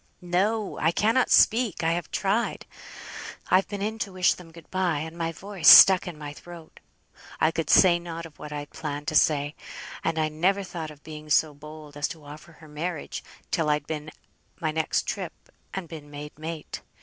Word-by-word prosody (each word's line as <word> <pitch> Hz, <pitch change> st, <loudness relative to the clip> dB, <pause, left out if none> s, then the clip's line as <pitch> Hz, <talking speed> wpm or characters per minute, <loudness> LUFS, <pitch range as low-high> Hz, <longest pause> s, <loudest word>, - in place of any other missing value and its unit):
"No! 200 Hz, +4 st, 0 dB
I 160 Hz, -, +2 dB
cannot 225 Hz, +7 st, +2 dB
speak! 225 Hz, -6 st, +4 dB
I 165 Hz, -, +2 dB
have 170 Hz, 0 st, -3 dB
tried. 205 Hz, +4 st, -1 dB, 0.9 s
I've 185 Hz, +1 st, +4 dB
been 200 Hz, -1 st, -5 dB
in 220 Hz, +2 st, -3 dB
to 205 Hz, -4 st, -3 dB
wish 185 Hz, 0 st, +3 dB
them 170 Hz, -2 st, -13 dB
good 165 Hz, -1 st, -15 dB
bye, 185 Hz, -4 st, 0 dB
and 160 Hz, +3 st, -5 dB
my 165 Hz, -1 st, -2 dB
voice 185 Hz, 0 st, -4 dB
stuck 190 Hz, 0 st, +10 dB
in 175 Hz, -3 st, -7 dB
my 145 Hz, -1 st, -7 dB
throat. 170 Hz, +1 st, -13 dB, 0.6 s
I 155 Hz, -, +3 dB
could 165 Hz, 0 st, -3 dB
say 175 Hz, -2 st, +6 dB
nought 170 Hz, -1 st, -7 dB
of 160 Hz, -3 st, -14 dB
what 150 Hz, -, -8 dB
I'd 145 Hz, -1 st, -6 dB
planned 150 Hz, -1 st, -6 dB
to 155 Hz, -, -5 dB
say; 145 Hz, -1 st, +3 dB, 0.5 s
and 165 Hz, 0 st, -1 dB
I 155 Hz, -1 st, +2 dB
never 185 Hz, +6 st, 0 dB
thought 170 Hz, -4 st, -6 dB
of 150 Hz, -1 st, -14 dB
being 155 Hz, -1 st, -10 dB
so 150 Hz, 0 st, +3 dB
bold 150 Hz, 0 st, -12 dB
as 145 Hz, 0 st, -1 dB
to 155 Hz, -3 st, -10 dB
offer 150 Hz, +3 st, -12 dB
her 155 Hz, 0 st, -16 dB
marriage 155 Hz, +1 st, -5 dB, 0.3 s
till 160 Hz, -2 st, +1 dB
I'd 150 Hz, -1 st, +1 dB
been 155 Hz, -1 st, -5 dB, 0.5 s
my 160 Hz, -2 st, -1 dB
next 160 Hz, 0 st, 0 dB
trip, -, -, -4 dB, 0.4 s
and 190 Hz, -3 st, -5 dB
been 155 Hz, -3 st, -10 dB
made 145 Hz, +1 st, -9 dB
mate. 160 Hz, 0 st, -6 dB
165 Hz, 195 wpm, -26 LUFS, 150-180 Hz, 0.9 s, stuck